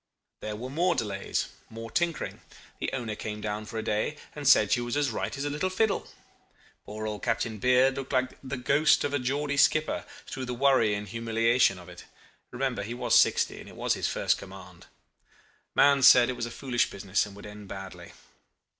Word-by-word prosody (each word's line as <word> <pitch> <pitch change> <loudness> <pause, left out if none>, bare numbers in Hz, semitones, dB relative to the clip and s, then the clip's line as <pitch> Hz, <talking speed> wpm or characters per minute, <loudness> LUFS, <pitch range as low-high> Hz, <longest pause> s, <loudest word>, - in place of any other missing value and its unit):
"There 105 0 -5
were 125 +4 -7
more 170 +4 +1
delays 100 -4 -2 0.2
more 115 0 -8
tinkering. 170 -2 -2 0.4
The - - -2
owner 120 -5 -3
came 105 0 -5
down 105 0 -4
for 115 - -6
a 110 - -2
day, 110 +7 -1 0.2
and 145 -2 -4
said 110 -7 +6
she 120 - +3
was 120 +3 -2
as 145 -4 +1
right 125 - -3
as 140 - -3
a - - -1
little 150 +6 -1
fiddle. 200 +2 0 0.8
Poor 110 +1 -6
old 105 -1 -4
Captain 115 -1 -1
Beard 125 +3 +3
looked 135 -1 -5
like 130 -1 +1
the 135 0 -4
ghost 140 +5 +3
of 145 - -2
a 145 - +1
Geordie 140 +3 -1
skipper 155 +3 +2 0.2
through 130 - -5
the 125 0 -4
worry 125 -5 +3
and 105 0 -5
humiliation 115 -2 +2
of 90 - -12
it. - - -12 0.4
Remember 130 0 -2
he 115 +4 -5
was - - -1
sixty, - - +4
and - - -11
it - - -13
was - - 0
his - - -1
first - - 0
command. 95 -2 -12 0.9
Mahon 140 -1 +5
said 125 -2 +7
it - - -3
was 120 -1 -3
a - - -7
foolish 125 -1 -1
business, 100 +1 -1
and 100 - -12
would 100 - -11
end 105 -1 -10
badly. 95 -1 -9
120 Hz, 200 wpm, -28 LUFS, 105-140 Hz, 0.9 s, said